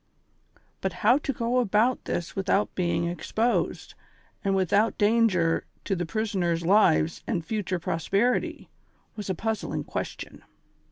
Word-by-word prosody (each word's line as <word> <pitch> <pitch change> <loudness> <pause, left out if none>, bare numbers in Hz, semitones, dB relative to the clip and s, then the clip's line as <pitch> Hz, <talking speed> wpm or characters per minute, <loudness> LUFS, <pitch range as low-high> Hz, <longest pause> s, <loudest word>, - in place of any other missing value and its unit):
But - - -1
liow 245 +7 +5
to 275 - -1
go 240 0 0
about 230 +2 +2
this 170 - -3
without 195 +1 +1
being 170 -1 0
exposed, 195 +8 -1 0.5
and 195 -1 +1
Avithout 200 +4 +2
dan 225 +2 +4
ger 170 -4 +1 0.2
to 195 - -1
tlie 175 -1 -2
iivisoners' 180 -5 -1
lives 170 -4 +3
and 170 -7 -2
future 205 -3 -2
prosperity, 195 +9 0 0.5
was 210 -2 -6
a 190 - 0
puzzling 220 +3 -2
question. - - -6
200 Hz, 130 wpm, -26 LUFS, 175-225 Hz, 0.5 s, liow